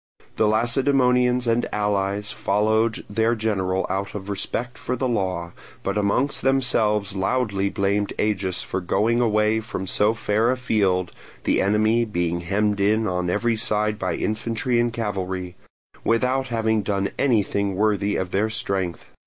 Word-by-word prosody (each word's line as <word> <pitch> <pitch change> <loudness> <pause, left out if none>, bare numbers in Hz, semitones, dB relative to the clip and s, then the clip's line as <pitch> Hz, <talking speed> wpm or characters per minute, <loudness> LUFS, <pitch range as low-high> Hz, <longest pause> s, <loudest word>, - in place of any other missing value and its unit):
The 110 - +3
Lacedaemonians 125 +2 +2
and 115 +1 0
allies 105 0 -1
followed 110 +2 +1
their 115 +3 +1
general 95 -4 -1
out 95 +2 -3
of 100 0 -5
respect 120 +5 -3
for 125 - -2
the 130 +1 -1
law, 90 -7 -2 0.3
but 100 - -1
amongst 105 +7 +1
themselves 110 -7 +2
loudly 100 -1 0
blamed 100 +1 0
Agis 95 -4 -1
for 95 - -3
going 110 +7 +1
away 110 -1 +2
from 110 -3 -5
so 105 +4 +2
fair 110 +1 +1
a 130 - +1
field 95 -7 +1 0.3
(the - - +2
enemy 110 +4 +2
being 85 -5 -1
hemmed 100 +3 0
in 110 +3 +2
on 90 -2 -1
every 115 +5 +1
side 105 0 0
by - - -1
infantry 115 +2 -1
and 120 0 +1
cavalry) 95 -5 -3 0.5
without 130 +3 +1
having 110 -2 +1
done 100 -1 -1
anything 100 -6 +1
worthy 105 0 +1
of 95 -1 -2
their 105 +3 +1
strength. 95 -5 -3
105 Hz, 145 wpm, -23 LUFS, 100-115 Hz, 0.5 s, The